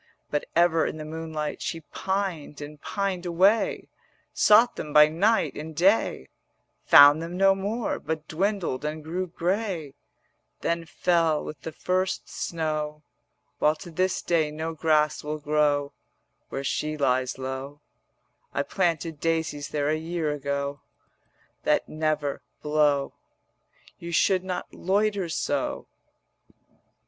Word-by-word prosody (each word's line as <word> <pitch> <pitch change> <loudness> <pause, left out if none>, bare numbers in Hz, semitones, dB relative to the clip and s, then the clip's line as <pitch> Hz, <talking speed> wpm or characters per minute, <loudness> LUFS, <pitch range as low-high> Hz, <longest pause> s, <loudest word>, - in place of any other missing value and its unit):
But 150 - -1
ever 165 -1 +4
in - - -5
the 155 - -6
noonlight 155 -1 -4
She 165 - -3
pined 190 -4 -3
and 145 0 -9
pined 195 -4 -2
away; 190 +6 +2 0.5
Sought 225 +3 +5
them 150 - -6
by 150 0 +8
night 205 +8 +2
and 155 +1 -7
day, 195 +7 +2 0.6
Found 145 +2 +9
them 170 +2 -5
no 195 0 +5
more, 205 +5 -2
but 155 -1 -4
dwindled 185 -5 -1
and 155 +1 -4
grew 180 +4 -3
grey; 180 -4 -2 0.7
Then 170 0 -1
fell 165 -2 +1
with 150 - -8
the 160 - -6
first 185 +4 -1
snow, 155 -2 -3 0.6
While 150 +1 +3
to 175 +1 -11
this 185 +2 0
day 160 -3 +2
no 160 +2 -4
grass 155 -1 +2
will 150 +1 -3
grow 145 -1 +1 0.6
Where 135 - -4
she 155 +2 -2
lies 130 -3 +1
low: 135 +2 -5 0.8
I - - +1
planted 165 -4 -1
daisies 160 -3 -1
there 145 -1 -1
a 155 - +2
year 160 -1 -2
ago 140 0 -3 0.8
160 - - -45
That - - +2
never 155 -2 -1 0.2
blow. 150 -2 +2 0.9
You 170 0 -7
should 185 +2 +3
not 185 -1 -5
loiter 200 -1 0
so.' - - -2
160 Hz, 130 wpm, -26 LUFS, 150-180 Hz, 0.9 s, Found